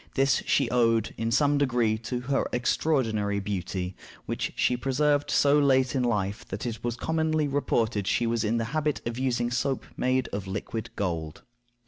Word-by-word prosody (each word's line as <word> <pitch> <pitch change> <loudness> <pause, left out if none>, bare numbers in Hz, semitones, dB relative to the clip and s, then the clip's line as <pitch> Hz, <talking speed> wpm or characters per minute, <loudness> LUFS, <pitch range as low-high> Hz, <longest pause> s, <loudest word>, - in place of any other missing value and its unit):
This 135 -1 +3
she 135 - +3
owed 115 -3 +2
in 115 - -2
some 145 +4 +3
degree 120 -5 +2
to 120 +2 -4
her 135 +2 0
extraordinary 115 -6 +1
beauty, 95 -2 -3 0.3
which - - -2
she 125 - +2
preserved 145 +3 +1
so 145 +1 +4
late 130 -2 +3
in 130 - +1
life 105 -4 -1
that 95 +4 -5
it 115 -2 -4
was 120 -1 -1
commonly 160 +2 0
reported 115 -7 0
she 120 - +1
was 115 0 0
in 110 +2 +1
the 115 - -1
habit 150 -2 0
of 120 +1 -4
using 120 -2 0
soap 130 +1 -1
made 130 0 +1
of 100 -1 -5
liquid 110 +4 -4
gold. 80 -5 -3
120 Hz, 170 wpm, -27 LUFS, 110-135 Hz, 0.3 s, so